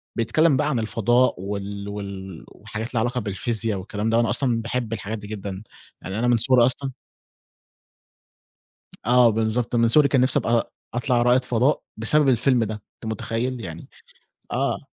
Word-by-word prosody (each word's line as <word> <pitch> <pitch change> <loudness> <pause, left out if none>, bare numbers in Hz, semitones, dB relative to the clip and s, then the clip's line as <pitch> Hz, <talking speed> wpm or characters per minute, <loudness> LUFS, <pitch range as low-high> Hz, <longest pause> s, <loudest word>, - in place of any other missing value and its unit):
بيتكلِّم 140 +5 +2
بقى 150 0 +1
عن 125 -5 0
الفضاء 120 +3 +2
وال 100 0 -5
وال 95 -3 -7
وحاجات 110 +3 -7
لها 110 - +1
علاقة 125 +2 -1
بالفيزيا 110 +2 -1
والكلام 105 +3 -3
ده، 115 - +2
وأنا 115 - +2
أصلًا 120 -4 +2
باحب 115 -1 -3
الحاجات 110 +1 -4
دي 105 0 -10
جدًا، 100 -1 -6 0.4
يعني 95 +4 -5
أنا 120 - +1
من 120 -1 +4
صغري 120 +1 +4
أصلًا 135 +1 0 2.2
آه 125 -1 +6
بالضبط، 115 +2 -1
من 115 -1 +3
صغري 145 +3 +5
كان 135 -3 +2
نِفْسي 130 +3 +4
أبقى 115 -2 0 0.2
أطلع 120 0 +1
رائد 125 +1 +3
فضاء 125 +4 +1
بسبب 140 +6 +2
الفيلم 125 -1 +3
ده، 110 0 -4 0.2
أنت 110 -1 -5
مُتخيّل؟ 120 +3 -3
يعني 85 -2 -8 0.6
آه. - - -1
115 Hz, 160 wpm, -23 LUFS, 105-125 Hz, 2.2 s, آه